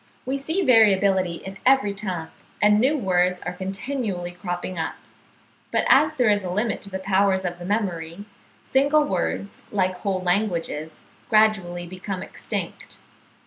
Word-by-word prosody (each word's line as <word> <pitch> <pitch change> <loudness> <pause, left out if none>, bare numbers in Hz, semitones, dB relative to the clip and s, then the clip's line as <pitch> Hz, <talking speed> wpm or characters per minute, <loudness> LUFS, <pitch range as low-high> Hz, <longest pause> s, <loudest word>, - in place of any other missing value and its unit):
We 265 +2 -1
see 320 +8 -1
variability 195 - +4
in 195 0 -8
every 260 -6 +4
tongue, 185 -5 -4 0.3
and 210 0 +5
new 275 +6 +3
words 180 -5 +1
are - - -4
continually 195 0 -4
cropping 175 0 -5
up; 160 - -2 0.8
but - - +1
as - - +5
there 245 -4 +3
is 205 -1 +1
a 180 - -4
limit 210 +6 -1
to 200 - -10
the 190 - -3
powers 190 0 +1
of 175 0 -3
the 175 - -7
memory, 185 -3 -2 0.4
single 285 +3 +3
words, 195 -2 -2
like 185 -2 0
whole 190 -2 -2
languages, 170 -5 -1 0.3
gradually 195 -5 +2
become 185 +1 -5
extinct. - - -6
195 Hz, 145 wpm, -24 LUFS, 180-215 Hz, 0.8 s, and